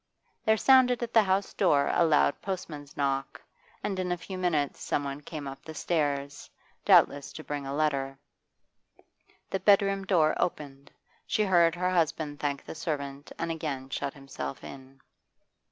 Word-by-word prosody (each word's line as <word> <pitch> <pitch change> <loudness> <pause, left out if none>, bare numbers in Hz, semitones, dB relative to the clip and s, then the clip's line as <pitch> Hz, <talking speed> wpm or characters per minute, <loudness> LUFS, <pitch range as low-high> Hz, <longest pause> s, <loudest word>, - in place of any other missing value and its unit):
There 220 0 +4
sounded 250 -1 +5
at 235 - -5
the 225 - +7
house 195 0 0
door 145 -8 +3
a 175 - +4
loud 150 -3 +3
postman's 155 -7 -6
knock, 135 -1 -1 0.4
and 195 -2 -2
in 180 -1 -1
a 175 - 0
few 185 +2 -8
minutes 165 -6 -1
someone 140 0 -2
came 150 -2 -7
up 135 +1 -8
the 160 0 -9
stairs, 145 -3 -2 0.3
doubtless 140 0 +4
to 155 - -8
bring 145 -2 -5
a 135 - -3
letter. 140 -3 0 1.3
The 195 - 0
bedroom 195 -1 +3
door 165 -5 +3
opened; 140 -5 -3 0.4
she 215 - +1
heard 175 -4 +4
her 180 +1 0
husband 160 -4 0
thank 140 -2 -2
the - - -7
servant 145 -3 -5
and 165 0 -2
again 140 -5 -4
shut 140 - -3
himself 135 - -7
in. 135 0 -11
155 Hz, 155 wpm, -28 LUFS, 140-180 Hz, 1.3 s, the